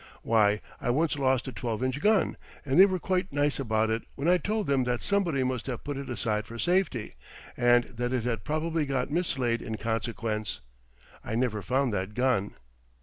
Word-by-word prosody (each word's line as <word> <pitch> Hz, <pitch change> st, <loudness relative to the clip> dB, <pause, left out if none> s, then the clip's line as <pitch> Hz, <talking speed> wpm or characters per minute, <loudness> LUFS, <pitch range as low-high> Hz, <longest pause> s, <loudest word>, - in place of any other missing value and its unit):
Why 105 Hz, -2 st, +3 dB, 0.2 s
I -, -, -2 dB
once 150 Hz, +6 st, +2 dB
lost 130 Hz, -2 st, +1 dB
a -, -, -3 dB
12 115 Hz, 0 st, -3 dB
inch 130 Hz, +2 st, -1 dB
gun, 210 Hz, +1 st, +3 dB, 0.3 s
and 140 Hz, +4 st, +2 dB
they 195 Hz, -, +10 dB
were 185 Hz, -1 st, -1 dB
quite 185 Hz, +1 st, -1 dB
nice 145 Hz, 0 st, +1 dB
about 110 Hz, -3 st, +1 dB
it 115 Hz, +1 st, 0 dB
when 140 Hz, +4 st, -2 dB
I 180 Hz, +1 st, +5 dB
told 215 Hz, +2 st, -1 dB
them 135 Hz, -2 st, +2 dB
that 120 Hz, -1 st, -1 dB
somebody 175 Hz, -9 st, +1 dB
must 130 Hz, -1 st, -2 dB
have 125 Hz, -3 st, -4 dB
put 145 Hz, -1 st, -4 dB
it 140 Hz, -1 st, -6 dB
aside 110 Hz, -3 st, -1 dB
for 115 Hz, -, -8 dB
safety, 175 Hz, -, 0 dB, 0.4 s
and 120 Hz, 0 st, +4 dB
that 120 Hz, 0 st, -4 dB
it 125 Hz, -3 st, 0 dB
had 115 Hz, -5 st, -2 dB
probably 155 Hz, 0 st, -1 dB
got 135 Hz, 0 st, -1 dB
mislaid 135 Hz, -8 st, 0 dB
in 110 Hz, -1 st, -4 dB
consequence. 110 Hz, -, -2 dB, 0.6 s
I 110 Hz, -, -3 dB
never 115 Hz, -3 st, 0 dB
found 130 Hz, +1 st, 0 dB
that 95 Hz, +2 st, -3 dB
gun. 125 Hz, -6 st, +1 dB
125 Hz, 195 wpm, -28 LUFS, 115-145 Hz, 0.6 s, they